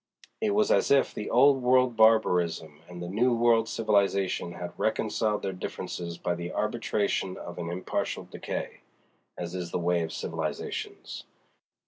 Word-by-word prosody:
It 210 -2 +1
was 210 0 +3
as - - +3
if 140 -1 +4
the 105 - -5
Old 135 +2 +5
World 125 -1 +3
barbarism 90 -9 +3
and 90 0 -7
the - - -5
New 120 +7 +2
World 115 -1 +3
civilization 100 -5 +1
had 90 0 -6
reconciled 105 -1 0
their 95 - -2
differences 85 -1 -5
by 90 - -1
the 85 0 -5
arbitration 105 -4 -1
of 85 0 -8
an 85 -1 -4
impartial 90 +2 -3
decay—as 85 0 -8
is 90 -2 -4
the - - -2
way 85 0 +1
of 80 -1 -3
civilizations. - - -5
100 Hz, 145 wpm, -28 LUFS, 85-115 Hz, -, Old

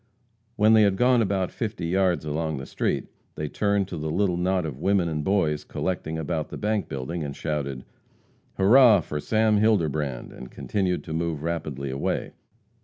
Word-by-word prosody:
When 110 +1 +5
they 110 - +7
had 100 -2 +4
gone 125 +3 +4
about 95 -3 0
fifty 110 -6 -4
yards 90 -3 +1
along 80 0 -2
the 65 - -6
street, - - -1 0.3
they 75 - -3
turned 100 +3 0
to 85 - -5
the 80 0 -3
little 95 +2 +1
knot 90 0 0
of 70 -4 -6
women 95 0 +2
and 75 -2 -2
boys 80 -5 +1
collecting 85 -3 -3
about 80 0 -3
the - - -7
bank 105 -1 -1
building, 70 +6 -4
and 70 -2 -5
shouted: 70 -4 -3 0.7
"Hurrah 110 +1 +6
for 75 -1 -5
Sam 110 +4 +2
Hilderbrand!" 80 - 0
and 65 - -10
continued 90 -6 -2
to 80 - -6
move 80 -2 -2
rapidly 75 -5 -3
away. 70 - -2
85 Hz, 175 wpm, -25 LUFS, 75-100 Hz, 0.7 s, they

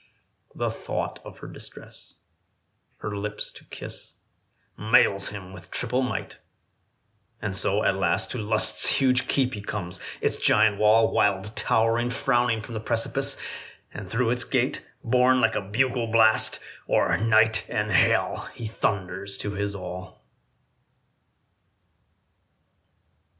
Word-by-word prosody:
The - - -1
thought - - -4
of - - -11
her - - -7
distress, - - -13 0.9
her 105 -1 -4
lips 105 +1 -4
to - - -15
kiss, - - -10 0.6
Mails 100 -2 +3
him 95 -2 -9
with 90 -1 -12
triple 125 +2 -1
might; 130 - -4 1.0
and 100 -3 -3
so 100 +2 +2
at 100 - +2
last 95 +1 0
To 125 - -4
Lust's 110 0 +3
huge 130 -1 +2
keep 130 -2 +1
he 105 - -5
comes; 95 -3 -4 0.2
its - - 0
giant 105 -2 +3
wall, 110 +1 +4
Wild 100 +1 +1
towering, 115 +2 +1
frowning 120 -3 +1
from 115 - -9
the 110 - -3
precipice; 115 +1 -1 0.6
And 100 -3 -8
through 115 +3 +1
its 125 0 +1
gate, - - -1 0.2
borne 125 +2 +3
like 115 -2 +3
a - - -1
bugle 115 +4 0
blast, 110 -1 +4 0.3
O'er - - +3
night 110 +1 +3
and 105 0 -1
hell 95 - +2
he 115 - -7
thunders 100 -2 -2
to 105 - -3
his 100 0 -3
all. 90 -1 -8
110 Hz, 130 wpm, -25 LUFS, 100-115 Hz, 1.0 s, wall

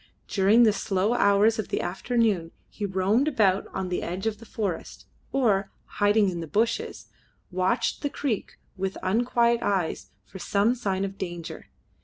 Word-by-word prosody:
During 205 +4 +4
the 215 -2 +5
slow 200 +1 0
hours 215 0 +3
of 215 - -2
the - - -2
afternoon 205 -3 0 0.2
he 205 - -4
roamed 195 +8 +1
about 200 -9 +2
on 190 -1 -4
the 180 - -1
edge 180 +4 -4
of 215 -2 -1
the 230 - -13
forest, 200 -6 -4 0.3
or, 210 -7 +2 0.3
hiding 205 0 +4
in 175 -2 -4
the 165 - -5
bushes, 225 +7 -1 0.4
watched 185 +1 0
the 285 - -1
creek 255 -8 -3 0.2
with 190 0 -3
unquiet 235 +4 +2
eyes 190 -5 -1 0.2
for 190 - -11
some 200 +5 +2
sign 195 -6 -1
of 195 0 -7
danger. 175 -3 -6
200 Hz, 160 wpm, -26 LUFS, 190-225 Hz, 0.4 s, the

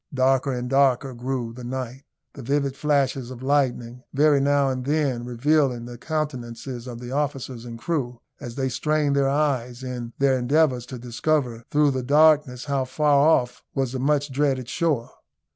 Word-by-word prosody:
Darker 135 +1 +2
and 125 -1 -3
darker 135 0 +2
grew 120 -1 -3
the 125 +1 -10
night; 130 +1 -5 0.3
the 140 - -9
vivid 140 +1 0
flashes 140 -4 0
of 130 -1 -9
lightning 125 -3 0
very 145 0 +4
now 140 0 +3
and 130 -1 -2
then 140 -4 0
revealing 125 0 +1
the 120 -1 -9
countenances 130 -5 -4
of 120 -2 -7
the 120 0 -8
officers 135 -4 -3
and 115 -1 -7
crew, 125 -3 -3 0.2
as 120 -1 -8
they 135 -1 -1
strained 150 +2 0
their 140 -1 +2
eyes 135 -4 -1
in 120 -2 -5
their 135 -2 +2
endeavours 125 -1 +2
to 130 - -7
discover 120 0 -1
through 145 -1 +3
the 130 -1 -2
darkness 145 -2 +3
how 140 -2 0
far 145 +2 +3
off 125 -6 +2
was 135 -3 0
the 130 - -4
much 145 +1 +1
dreaded 135 -2 0
shore. 145 -4 -1
130 Hz, 170 wpm, -24 LUFS, 125-145 Hz, 0.3 s, very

